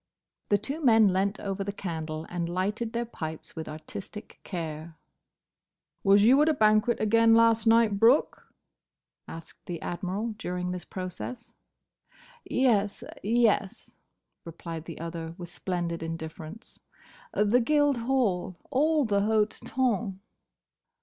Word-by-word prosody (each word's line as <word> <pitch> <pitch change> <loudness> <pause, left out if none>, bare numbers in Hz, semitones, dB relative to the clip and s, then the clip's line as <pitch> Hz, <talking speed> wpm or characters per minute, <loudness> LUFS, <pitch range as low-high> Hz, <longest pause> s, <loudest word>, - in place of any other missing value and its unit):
The 205 - +4
two 285 +9 -4
men 225 -5 +6
leant 195 +2 0
over 195 0 -3
the 200 - -3
candle 160 -5 -5
and 170 -1 -3
lighted 205 +6 -2
their 235 0 -2
pipes 160 -8 -7
with 160 - -6
artistic 160 +7 -9
care. 160 -2 -6 1.1
"Was 200 0 +5
you 260 +6 +6
at 305 - +4
a 310 - +2
banquet 215 +1 +3
again 225 +1 +4
last 230 0 +4
night, 225 -3 +4
Brooke?" 235 +7 +3 0.8
asked 165 0 -11
the 170 -2 -4
Admiral, 195 +6 -3
during 180 -2 -3
this 180 -1 -6
process. 185 +6 -7 0.9
"Yes—yes," 215 -2 0 0.5
replied 165 -1 -7
the 165 - -8
other, 165 0 -6
with 175 -2 -8
splendid 175 -2 -3
indifference. 165 +5 -8 0.6
"The 210 +4 +3
Guildhall. 250 - +1 0.2
All 300 +2 +2
the 200 -2 +1
hote 215 0 +1
tonn." 225 -7 -1
200 Hz, 120 wpm, -28 LUFS, 175-230 Hz, 1.1 s, men